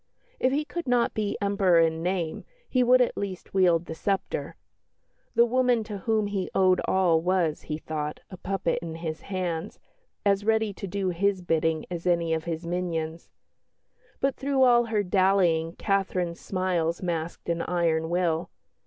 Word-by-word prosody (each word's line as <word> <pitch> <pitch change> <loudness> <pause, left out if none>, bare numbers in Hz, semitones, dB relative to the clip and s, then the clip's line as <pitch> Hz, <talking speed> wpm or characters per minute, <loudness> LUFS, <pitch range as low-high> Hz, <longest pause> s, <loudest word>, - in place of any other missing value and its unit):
If 255 - +2
he 295 +3 0
could 345 -1 -5
not 245 -1 +2
be 210 -2 -2
Emperor 200 -4 +3
in 165 0 +2
name, 175 -2 -2 0.2
he 255 - +1
would 250 +1 +5
at 245 - +1
least 190 -2 -5
wield 175 -3 +3
the 160 - -6
sceptre. 195 +4 -2 0.8
The 235 - +6
woman 245 -1 +2
to 210 -2 -6
whom 220 +1 +1
he 200 -2 -2
owed 185 -1 +4
all 175 -4 +3
was, 175 -3 +1
he 150 - -4
thought, 150 -1 -4
but - - -15
a 185 - -10
puppet 195 -3 -1
in 165 -1 -6
his 160 -1 -5
hands, 180 -4 -3 0.5
as 200 0 +3
ready 220 -1 +1
to 195 - -7
do 195 0 -1
his 185 +1 0
bidding 160 -2 0
as 175 0 -4
any 170 -2 +2
of 160 0 -2
his 165 0 -4
minions. 170 -2 -3 0.9
But 275 0 +1
through 275 -1 +1
all 240 -1 +5
her 215 -2 0
dallying 180 -4 +2
Catherine's 185 -4 -1
smiles 180 -3 -1
masked 170 -2 -3
an 170 0 0
iron 165 -2 0
will. 170 -1 0
185 Hz, 170 wpm, -26 LUFS, 165-205 Hz, 0.9 s, The